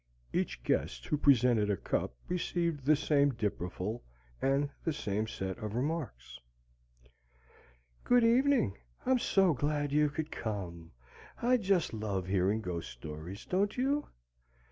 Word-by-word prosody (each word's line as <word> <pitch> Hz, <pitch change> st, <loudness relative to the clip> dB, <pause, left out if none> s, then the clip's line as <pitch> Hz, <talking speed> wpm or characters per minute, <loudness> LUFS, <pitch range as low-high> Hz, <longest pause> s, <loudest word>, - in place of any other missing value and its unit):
Each -, -, -1 dB
guest -, -, -1 dB
who -, -, 0 dB
presented 125 Hz, -7 st, +4 dB
a 100 Hz, -, +1 dB
cup -, -, -2 dB
received 170 Hz, -4 st, -1 dB
the 155 Hz, +2 st, +6 dB
same 145 Hz, -2 st, +3 dB
dipperful 105 Hz, +1 st, -3 dB, 0.4 s
and 140 Hz, +1 st, +1 dB
the 165 Hz, -, 0 dB
same 105 Hz, -4 st, -2 dB
set 95 Hz, 0 st, -4 dB
of 105 Hz, -1 st, -4 dB
remarks. 125 Hz, -, -3 dB, 1.6 s
"Good 245 Hz, -1 st, +4 dB
evening. 245 Hz, -, +3 dB, 0.3 s
I'm 260 Hz, 0 st, +3 dB
so 190 Hz, -6 st, +3 dB
glad 145 Hz, +1 st, -1 dB
you 150 Hz, +1 st, +3 dB
could 155 Hz, +2 st, -4 dB
come! 85 Hz, -7 st, -5 dB, 0.5 s
I 250 Hz, +2 st, +4 dB
just 190 Hz, -, +1 dB
love 105 Hz, -4 st, -2 dB
hearing 95 Hz, +3 st, +1 dB
ghost 90 Hz, -4 st, -4 dB
stories, 80 Hz, -, -8 dB
don't 200 Hz, +4 st, 0 dB
you? 280 Hz, +4 st, +1 dB
135 Hz, 130 wpm, -32 LUFS, -, 1.6 s, the